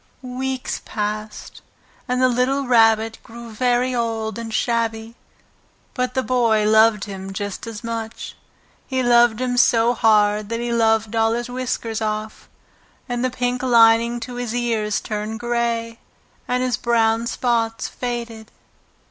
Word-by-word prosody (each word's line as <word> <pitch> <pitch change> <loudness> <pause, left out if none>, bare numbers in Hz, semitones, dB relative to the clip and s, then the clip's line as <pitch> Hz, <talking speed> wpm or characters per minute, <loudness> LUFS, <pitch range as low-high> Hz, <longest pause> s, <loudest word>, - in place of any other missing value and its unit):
Weeks 255 +1 -4
passed, 215 0 -5 0.5
and 250 0 0
the - - +6
little 255 +3 0
Rabbit 225 -2 +3
grew 235 0 -11
very 245 +3 +1
old 225 -2 -2
and 230 -1 -6
shabby, 225 -1 -1 0.8
but 250 -1 -2
the 260 - +1
Boy 230 -4 +2
loved 220 -1 +4
him 195 -1 -7
just 205 +2 -5
as 225 -1 -7
much. 230 0 -5 0.5
He 260 -1 -1
loved 240 -2 +4
him 250 -1 -1
so 235 -1 +4
hard 210 -2 +2
that 230 0 -2
he 240 0 -2
loved 225 -1 +1
all 225 0 +2
his 240 +1 -3
whiskers 245 -3 -3
off, 215 0 -4 0.6
and 245 0 -2
the 255 - +1
pink 250 0 -2
lining 235 -1 +4
to 245 +2 -7
his 245 -1 -3
ears 225 -3 -1
turned 215 +1 -4
grey, 235 -1 -2 0.5
and 250 0 0
his 250 -3 0
brown 230 -1 +1
spots 230 -2 -1
faded. 235 -3 -5
230 Hz, 140 wpm, -21 LUFS, 220-245 Hz, 0.8 s, the